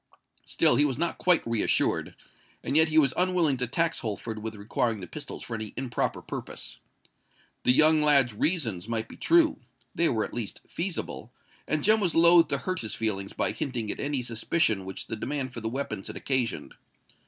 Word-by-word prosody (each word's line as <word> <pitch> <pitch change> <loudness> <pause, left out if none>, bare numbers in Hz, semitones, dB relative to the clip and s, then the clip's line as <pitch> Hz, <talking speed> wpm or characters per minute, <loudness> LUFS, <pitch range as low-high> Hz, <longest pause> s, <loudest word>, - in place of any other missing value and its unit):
Still 120 - +3
he 145 - +5
was 135 -4 -1
not 170 +2 -1
quite 180 -2 +3
reassured; 115 -2 0 0.5
and - - -2
yet 160 +1 +5
he 155 - 0
was 140 -4 +5
unwilling 180 -6 +2
to 125 0 -1
tax 165 +6 0
Holford 110 0 -4
with 110 0 -5
requiring 110 +2 -1
the 90 - -6
pistols - - -8
for 120 - -7
any 110 -2 -5
improper 130 -2 -2
purpose. - - -7 0.9
The - - +6
young 155 +3 +5
lad's 140 -6 +5
reasons 110 - -1
might 115 -1 -2
be - - -12
true—they 135 - +1
were 110 -3 0
at - - -10
least 115 -4 -5
feasible; 170 - -4 0.4
and 155 -1 0
Jem 215 +2 +4
was 180 -5 0
loth 170 0 +7
to 140 - +1
hurt 185 +5 -3
his 110 -3 -5
feelings 100 -3 -2
by - - 0
hinting 120 -7 -3
at - - -7
any 140 -3 -2
suspicion 115 - 0
which 95 - -6
the 115 - -4
demand 130 +2 -4
for 115 - -6
the 110 - -2
weapons 115 -6 -4
had - - -7
occasioned. 130 -4 -1
130 Hz, 190 wpm, -27 LUFS, 110-160 Hz, 0.9 s, loth